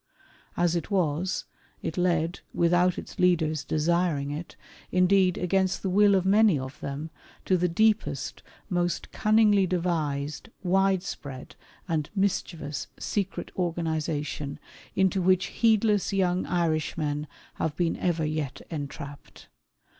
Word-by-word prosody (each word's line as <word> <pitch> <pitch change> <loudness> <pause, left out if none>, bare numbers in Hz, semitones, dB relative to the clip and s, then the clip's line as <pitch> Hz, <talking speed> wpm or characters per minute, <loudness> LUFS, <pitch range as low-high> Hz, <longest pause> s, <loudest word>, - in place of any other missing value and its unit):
As 175 0 +2
it 170 - -2
was, 180 -2 0 0.4
it 160 - -3
led, 175 -2 +1 0.2
without 175 +1 +3
its - - -8
leaders 160 -4 +2
desiring 155 -2 +1
it 155 +4 -6 0.2
— - - -21
indeed 185 0 +4
against 190 +1 +1
the 190 - 0
will 205 +1 +5
of 190 -1 +1
many 205 -3 +5
of 130 +1 -6
them 145 +3 -5 0.2
— - - -26
to 185 - +3
the 180 0 +2
deepest, 205 -7 +1 0.3
most 175 -2 -1
cunningly 210 -3 +4
devised, 155 -2 -2
widespread, 185 -8 -1 0.3
and 155 -4 -1
mischievous, 170 -6 -1
secret 195 -2 -3
organization 160 -4 -2 0.4
into 190 0 +2
which 185 +1 +3
heedless 215 -3 +3
young 185 -2 +1
Irishmen 155 -3 -1 0.3
have 155 -2 -1
been 170 -1 0
ever 170 -3 0
yet 150 -3 -3
entrapped. 145 -1 -7
175 Hz, 125 wpm, -27 LUFS, 155-190 Hz, 0.4 s, will